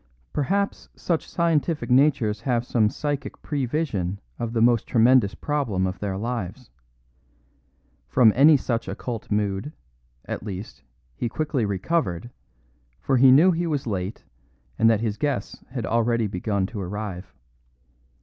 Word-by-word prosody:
Perhaps 200 +7 -1
such 170 -3 -2
scientific 165 -4 0
natures 125 -6 +3
have 120 -1 0
some 110 -4 +2
psychic 145 +3 -4
prevision 125 - -2 0.2
of 115 -1 -2
the 115 - -1
most 115 -1 +3
tremendous 115 -3 +4
problem 125 -11 -1
of 95 0 -3
their 100 -2 -3
lives. 115 +1 -5 1.4
From 115 -5 +5
any 145 +3 +7
such 120 -3 -2
occult 110 +4 -5
mood, 105 +6 -1 0.5
at - - -4
least, 95 -5 -7 0.3
he 115 - -3
quickly 150 -3 -1
recovered, 100 - -1 0.7
for 135 - +1
he 130 +1 +7
knew 160 +8 +7
he 170 0 -1
was 145 -4 -1
late, 100 -2 -4 0.6
and 115 - +5
that 110 -2 +2
his 110 -2 -2
guests 145 -3 -3
had 125 -3 -4
already 115 0 +1
begun 100 0 -1
to 105 +1 -6
arrive. 95 0 -5
115 Hz, 135 wpm, -24 LUFS, 105-140 Hz, 1.4 s, any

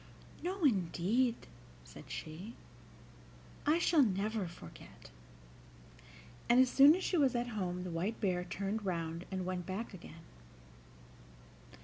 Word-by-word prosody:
"No, 370 +1 -3
indeed," 225 - +1 0.4
said - - -13
she, 175 +9 -7 1.1
"I 305 +2 +5
shall 340 -2 +4
never 210 -2 0
forget;" 125 - -13 1.4
and 240 - +6
as 260 -1 +5
soon 285 +3 +8
as 375 - -4
she 360 - 0
was 270 -5 +3
at 240 0 -1
home 180 -5 -3
the 180 - -5
White 180 +7 -2
Bear 180 -4 0
turned 195 +4 -3
round 170 -2 -3
and 185 -2 -3
went 180 -1 -4
back 205 +4 -4
again. 165 -2 -11
200 Hz, 125 wpm, -34 LUFS, 180-245 Hz, 1.4 s, soon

